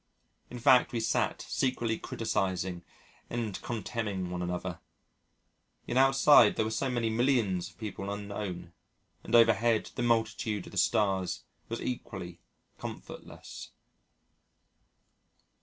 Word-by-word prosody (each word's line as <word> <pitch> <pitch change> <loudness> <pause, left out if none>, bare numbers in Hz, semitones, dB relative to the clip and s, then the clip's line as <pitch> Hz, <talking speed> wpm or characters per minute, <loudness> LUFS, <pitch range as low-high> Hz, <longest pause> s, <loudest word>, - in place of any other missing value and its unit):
In 125 - -7
fact, 125 0 +5
we 120 - 0
sat 110 - 0
secretly 120 -3 0
criticising 95 -5 -2 0.5
and 115 -4 -3
contemning 105 -5 -3
one 90 0 -3
another... 90 -1 -3 1.1
yet 120 - -3
outside 135 +2 +6
there 110 - +1
were 110 - -2
so 130 +4 -1
many 120 -2 0
millions 110 -7 +1
of 85 - -22
people 100 -2 -5
unknown, 100 -4 -5 0.5
and 115 - 0
overhead 115 0 +4
the - - -4
multitude 115 -3 0
of - - -11
the 100 - -8
stars 95 -1 +1 0.3
was 115 - -4
equally 95 -8 -5 0.4
comfortless. - - -9
110 Hz, 115 wpm, -30 LUFS, 95-120 Hz, 1.1 s, outside